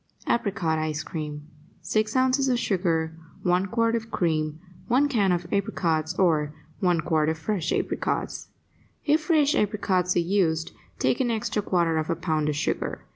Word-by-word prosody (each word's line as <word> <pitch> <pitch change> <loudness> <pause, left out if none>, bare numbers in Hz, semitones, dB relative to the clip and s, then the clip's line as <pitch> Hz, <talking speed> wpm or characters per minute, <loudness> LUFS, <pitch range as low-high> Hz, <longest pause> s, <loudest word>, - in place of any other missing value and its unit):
APRICOT 175 -8 0
ICE 155 0 -2
CREAM 150 -2 -6 0.4
6 215 +6 0
ounces 260 +1 +3
of 250 - +2
sugar 170 -7 0 0.3
1 180 +2 +2
quart 230 +2 +1
of 225 -1 -3
cream 155 -4 0 0.3
1 265 +4 +3
can 210 -9 +2
of 175 -1 0
apricots 165 -5 0
or 155 -5 +2 0.2
1 175 -3 +2
quart 155 -2 +1
of 160 - -1
fresh 170 -1 -2
apricots - - -2 0.6
If 305 +1 +3
fresh 305 -3 +3
apricots 190 -3 +1
are - - +4
used, 170 -3 +1 0.3
take - - +1
an 255 -2 +1
extra 220 -2 -1
quarter 170 -5 +1
of 155 - -3
a 170 - +1
pound 155 -2 0
of 150 - -1
sugar. 155 - -2
180 Hz, 160 wpm, -26 LUFS, 160-215 Hz, 0.6 s, are